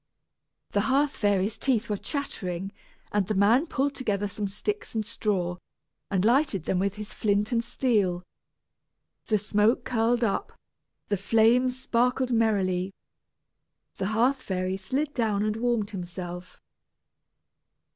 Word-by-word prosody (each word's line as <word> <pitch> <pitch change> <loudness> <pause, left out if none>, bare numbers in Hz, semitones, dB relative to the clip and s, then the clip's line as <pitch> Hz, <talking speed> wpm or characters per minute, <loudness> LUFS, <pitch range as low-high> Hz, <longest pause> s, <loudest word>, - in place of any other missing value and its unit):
The 200 - +2
hearth 280 +2 +3
fairy's 205 -1 0
teeth 235 -4 +1
were 210 - 0
chattering, 195 - -4 0.4
and 205 -3 +1
the 215 - -1
man 225 - +4
pulled 280 -1 0
together 205 -6 -1
some 205 0 -3
sticks 235 - -4
and 215 -1 0
straw, 180 -5 -1 0.5
and 190 -1 +1
lighted 240 - +3
them 180 - +1
with 200 +1 0
his 210 0 -8
flint 210 +1 +1
and 235 -1 +1
steel. 210 -8 +1 1.0
The 215 - +3
smoke 210 +3 +2
curled 235 0 +1
up, 225 - -1 0.6
the 205 - +1
flames 235 +6 +3
sparkled 250 0 +1
merrily. 195 -5 +1 1.0
The 190 - -1
hearth 245 +5 +2
fairy 185 -3 -2
slid 265 +10 -2
down 215 -4 +1
and 215 0 0
warmed 230 -3 0
himself. 180 -1 -7
215 Hz, 130 wpm, -27 LUFS, 195-245 Hz, 1.0 s, man